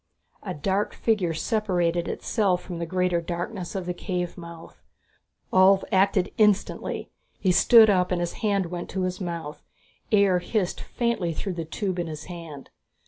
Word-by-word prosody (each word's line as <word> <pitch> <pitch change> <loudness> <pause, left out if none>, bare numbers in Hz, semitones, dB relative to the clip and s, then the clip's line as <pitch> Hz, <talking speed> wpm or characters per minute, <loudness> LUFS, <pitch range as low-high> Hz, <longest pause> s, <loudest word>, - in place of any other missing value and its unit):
A - - -5
dark 195 +7 -1
figure 190 -8 0
separated 175 -5 0
itself 195 -6 0
from 175 -2 -6
the 170 - -3
greater 180 -1 +1
darkness 175 +3 -5
of 190 -2 -3
the 180 - -2
cave 180 -1 -3
mouth. 170 -1 -11 0.7
Ulv 190 +1 +6
acted 190 -1 +2
instantly. 210 -2 +1 0.3
He 185 - +2
stood 220 +5 +7
up 185 -3 +2
and 180 - +1
his 175 0 -2
hand 200 -4 +1
went 175 -1 -5
to 190 0 -2
his 185 +1 -3
mouth; 170 -4 -5 0.5
air 200 -4 +4
hissed 185 0 -2
faintly 235 -9 -1
through 190 +4 -4
the 165 -2 -4
tube 185 +2 -3
in 170 - -2
his 155 -1 -6
hand. 165 -6 -9
180 Hz, 160 wpm, -25 LUFS, 170-200 Hz, 0.7 s, stood